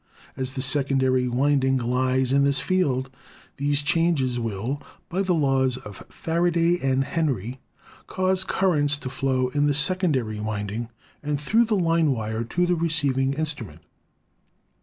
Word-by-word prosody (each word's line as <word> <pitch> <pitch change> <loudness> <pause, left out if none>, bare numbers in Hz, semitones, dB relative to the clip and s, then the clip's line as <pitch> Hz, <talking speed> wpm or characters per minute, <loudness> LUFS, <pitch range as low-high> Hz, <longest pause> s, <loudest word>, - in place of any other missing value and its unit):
As 130 0 -5
the 130 - -1
secondary 130 -2 +2
winding 135 +1 +2
lies 130 +1 0
in 140 +1 +4
this 140 -1 +2
field, 135 -9 0 0.5
these 145 +1 0
changes 145 -6 +1
will, 115 +5 -3 0.3
by 185 +3 -1
the 185 -2 +1
laws 135 -4 +1
of 105 -5 -10
Faraday 170 +1 +1
and 135 0 +1
Henry, 130 - -2 0.5
cause 185 0 0
currents 150 -7 +1
to 130 -3 -7
flow 130 -1 0
in 145 +2 +1
the 145 - +1
secondary 150 - +1
winding 105 +2 -4 0.3
and 150 -1 -2
through 225 +10 +3
the 220 -1 0
line 165 -3 +2
wire 110 -1 -3
to 175 +10 0
the 175 0 +1
receiving 145 -5 +1
instrument. 150 -6 -5
135 Hz, 140 wpm, -24 LUFS, 130-165 Hz, 0.5 s, in